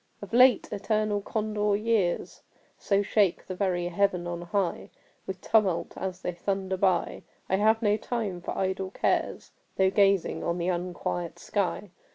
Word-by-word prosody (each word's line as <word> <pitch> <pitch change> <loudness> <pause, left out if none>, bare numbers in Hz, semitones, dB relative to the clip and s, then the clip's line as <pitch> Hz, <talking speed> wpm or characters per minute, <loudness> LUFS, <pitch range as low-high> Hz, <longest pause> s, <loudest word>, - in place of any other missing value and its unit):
Of 205 +1 -10
late, 250 -1 +6
eternal 210 0 0
Condor 210 -1 -1
years 210 -4 0 0.4
So 200 0 +1
shake 200 -3 +1
the 185 - -5
very 180 -2 -1
Heaven 180 -1 +1
on 175 0 -4
high 175 +1 -2 0.4
With 190 -1 -5
tumult 205 -6 +1
as 185 0 -5
they 180 - -1
thunder 190 +2 -2
by, 185 -2 +1 0.3
I 190 - +1
have 220 +3 +3
no 210 0 +3
time 215 -6 -3
for - - -5
idle 190 0 -1
cares - - -1 0.3
Though 190 0 +4
gazing 195 -2 +2
on 170 +1 -1
the 175 +1 -1
unquiet 175 -1 -3
sky. 200 -1 -2
195 Hz, 155 wpm, -27 LUFS, 180-210 Hz, 0.4 s, late